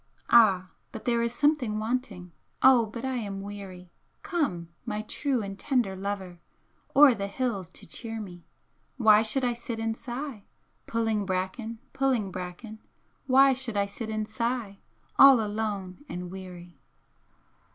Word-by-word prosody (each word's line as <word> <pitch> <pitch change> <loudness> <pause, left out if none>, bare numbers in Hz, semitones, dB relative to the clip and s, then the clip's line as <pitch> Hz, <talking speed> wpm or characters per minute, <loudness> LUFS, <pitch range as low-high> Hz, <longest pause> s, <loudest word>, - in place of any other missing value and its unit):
Ah, 195 -6 +5 0.2
but 225 - -9
there 235 -1 +2
is 235 0 0
something 260 -4 +1
wanting, 215 -5 -3 0.3
Oh 255 -4 +7
but 230 +3 -6
I 260 -1 -1
am 200 -4 -4
weary! 195 -3 -9 0.3
Come, 295 - -1
my 215 -2 -3
true 260 +1 -1
and 195 0 -7
tender 245 -9 0
lover, 190 -2 -5 0.6
O'er 280 -2 +8
the 200 -3 -3
hills 200 -5 -2
to - - -10
cheer 225 +6 -6
me! 175 -5 -9 0.5
Why 215 -4 +6
should 240 +4 -1
I 245 - +1
sit 235 0 -6
and 225 0 -1
sigh, 240 -3 -6 0.4
Pu'in' 225 -2 0
bracken, 190 +5 -3 0.2
pu'in' 255 -8 +1
bracken, 185 +5 -7 0.5
Why 270 +1 +6
should 250 -4 -4
I 200 - +2
sit 210 +3 -7
and 215 -1 -2
sigh, 230 -2 -3 0.4
All 275 -3 +9
alone 205 -1 -3
and 180 0 -6
weary!" 180 -4 -10
220 Hz, 145 wpm, -28 LUFS, 195-245 Hz, 0.6 s, All